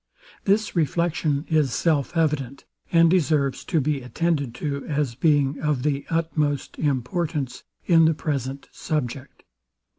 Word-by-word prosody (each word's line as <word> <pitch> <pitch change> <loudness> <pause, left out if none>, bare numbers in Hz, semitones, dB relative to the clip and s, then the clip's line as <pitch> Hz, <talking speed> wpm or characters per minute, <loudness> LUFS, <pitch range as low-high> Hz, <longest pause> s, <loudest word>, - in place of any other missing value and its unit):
This 205 +1 +1
reflection 160 -2 0
is 155 -5 +2
self 160 -1 0
evident, 145 -5 -1 0.3
and 170 -1 +6
deserves 155 -6 +1
to 165 - +1
be 145 -1 0
attended 140 -1 -1
to, 140 -2 -3
as 145 -5 -1
being 145 +1 +2
of 150 -4 0
the 140 -1 -1
utmost 155 -4 -1
importance 145 -1 -2 0.2
in 165 -2 +5
the 160 0 +3
present 140 -3 -3
subject. 140 -3 -4
150 Hz, 125 wpm, -24 LUFS, 140-165 Hz, 0.3 s, and